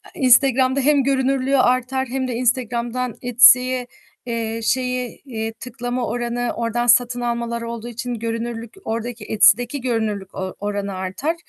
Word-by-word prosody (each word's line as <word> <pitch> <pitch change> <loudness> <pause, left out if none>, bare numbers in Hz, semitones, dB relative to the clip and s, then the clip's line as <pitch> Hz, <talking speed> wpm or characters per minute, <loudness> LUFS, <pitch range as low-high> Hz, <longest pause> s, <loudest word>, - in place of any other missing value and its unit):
Instagram'da 260 -1 +4
hem 285 0 +3
görünürlüğü 270 0 +1
artar 255 +1 +1
hem 260 +1 -2
de 245 - -3
Instagram'dan 245 0 -1
Etsy'ye, 250 +1 +5 0.4
eee, 230 -1 -3
şeyi, 250 0 -1
iii, 225 -4 -4
tıklama 245 +1 -4
oranı 240 +1 -2
oradan 235 +1 -1
satın 245 +1 +3
almalar 235 -1 -2
olduğu 230 0 -6
için, 245 +1 -5
görünürlük 230 0 -4
ordaki 230 0 -4
Etsy'deki 240 +6 +3
görünürlük 215 -6 -2
o 190 -1 -5
oranı 200 -1 -3
artar. 190 - -3
240 Hz, 130 wpm, -21 LUFS, 230-255 Hz, 0.4 s, Etsy'ye